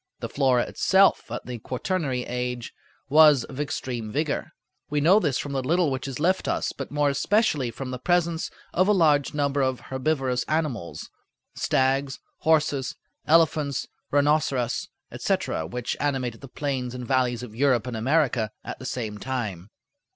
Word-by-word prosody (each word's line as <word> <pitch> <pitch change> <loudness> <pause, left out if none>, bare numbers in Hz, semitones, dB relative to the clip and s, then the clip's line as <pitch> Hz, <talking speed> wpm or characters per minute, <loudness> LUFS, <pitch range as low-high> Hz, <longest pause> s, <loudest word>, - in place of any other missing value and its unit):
The - - -5
flora 130 -3 +2
itself 195 +1 +3
at - - -5
the 125 -1 -6
quaternary 130 - -2
age 125 -1 -4 0.3
was 150 -3 +6
of 135 - -9
extreme 125 -6 -3
vigor. 150 +3 -1 0.4
We 150 - 0
know 175 +8 +6
this 145 - 0
from 145 - -4
the 135 -1 -1
little 165 +3 +2
which 130 +1 -3
is 135 -1 -5
left 185 +4 +1
us, - - 0
but - - -6
more 145 -1 +1
especially 150 - +1
from 130 +3 -6
the 125 - -5
presence 170 +2 +1 0.2
of 185 +2 +3
a 210 - +5
large 150 -7 +3
number 140 -1 +1
of 130 -1 0
herbivorous 130 -2 -1
animals—stags, 135 - -2 0.2
horses, 150 -4 +1 0.3
elephants, 155 -4 +3 0.2
rhinoceros, 145 -4 +1 0.2
etc.—which 95 +10 -2
animated 130 -5 -1
the 135 - -9
plains 130 -2 -3
and 125 -1 -6
valleys 125 -2 +1
of 115 -4 -8
Europe 125 -1 +2
and 125 -2 -4
America 125 -2 +1
at - - -7
the 130 - -8
same 110 -5 -4
time. 105 -7 -4
135 Hz, 150 wpm, -25 LUFS, 125-150 Hz, 0.4 s, was